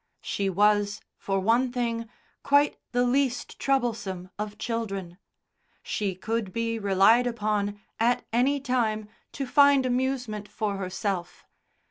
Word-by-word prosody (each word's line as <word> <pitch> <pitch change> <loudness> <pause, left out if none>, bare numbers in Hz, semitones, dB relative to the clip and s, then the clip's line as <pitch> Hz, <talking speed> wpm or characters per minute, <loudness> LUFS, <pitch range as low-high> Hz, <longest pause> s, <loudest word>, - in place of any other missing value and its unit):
She 195 -1 -1
was, 205 +2 +2 0.2
for 195 -1 -1
one 235 +6 +2
thing, 230 -2 -2 0.3
quite 285 +1 +3
the 245 0 +2
least 255 -1 0
troublesome 215 -9 -1
of 210 0 -4
children. 195 -6 -4 0.6
She 200 -3 -2
could 220 +1 -2
be 230 +2 -2
relied 205 +5 +4
upon, 210 -3 -1 0.2
at 235 +2 +2
any 265 +4 +3
time, 230 -5 0 0.3
to 275 - -3
find 280 0 +5
amusement 245 -4 -1
for 205 -1 -3
herself. 185 -1 -4
225 Hz, 120 wpm, -27 LUFS, 200-245 Hz, 0.6 s, find